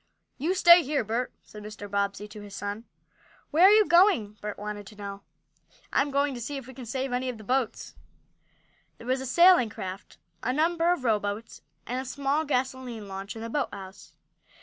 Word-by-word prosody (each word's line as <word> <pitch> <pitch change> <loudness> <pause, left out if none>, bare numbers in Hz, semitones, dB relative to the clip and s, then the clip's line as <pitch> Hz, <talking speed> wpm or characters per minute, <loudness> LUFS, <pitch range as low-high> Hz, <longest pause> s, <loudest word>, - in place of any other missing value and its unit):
"You 335 +7 0
stay 350 -2 +8
here, 290 -3 -1
Bert," 230 +4 -2
said 210 - -12
Mr. 210 0 -8
Bobbsey 200 0 -2
to 210 0 -10
his 205 -1 -10
son. 205 +3 -5 0.7
"Where 330 +5 +6
are - - +9
you 425 0 +6
going?" 345 - +4
Bert 210 -1 -5
wanted 205 -1 -6
to 210 - -12
know. 200 -1 -7 0.7
"I'm 280 +1 +2
going 280 0 +1
to 240 - -7
see 280 +5 -4
if 270 - -8
we 260 - -11
can 250 -2 -9
save 260 +2 -3
any 255 +1 -1
of 245 - -5
the 215 - -12
boats." 255 0 -1 1.0
There - - -12
was 260 +1 0
a 265 - -5
sailing 345 -4 +6
craft, 190 -1 -8 0.2
a 250 - -1
number 335 +3 +2
of 355 -7 -1
rowboats, 215 -1 -1 0.2
and 250 +2 -2
a - - -8
small 280 +4 -1
gasoline 255 -5 -2
launch 195 +2 -6
in 225 - -7
the 230 - -5
boathouse. 200 -8 -5
245 Hz, 195 wpm, -27 LUFS, 210-280 Hz, 1.0 s, are